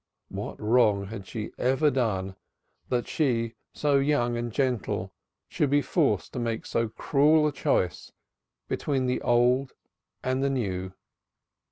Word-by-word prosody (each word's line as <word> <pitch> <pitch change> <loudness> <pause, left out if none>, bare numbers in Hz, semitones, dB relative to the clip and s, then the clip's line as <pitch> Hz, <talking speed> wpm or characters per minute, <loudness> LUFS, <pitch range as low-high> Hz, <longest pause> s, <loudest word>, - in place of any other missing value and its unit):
What - - -6
wrong 105 -3 +3
had 100 -2 -8
she 110 -2 -5
ever 135 +4 +3
done 95 -8 -1 0.5
that 120 -2 0
she 115 -6 0 0.2
so 145 -2 +2
young 135 -4 +1
and 120 0 -3
gentle 125 - -1 0.3
should 145 - 0
be 145 +1 +3
forced 130 - 0
to - - -3
make 115 -2 -2
so 115 -1 0
cruel 150 +6 +3
a 150 - +2
choice 90 - -1 0.6
between 135 -3 -1
the 125 0 0
old 125 +2 +2 0.5
and 130 +1 0
the 140 - +2
new? 95 -8 -2
125 Hz, 140 wpm, -27 LUFS, 110-140 Hz, 0.6 s, wrong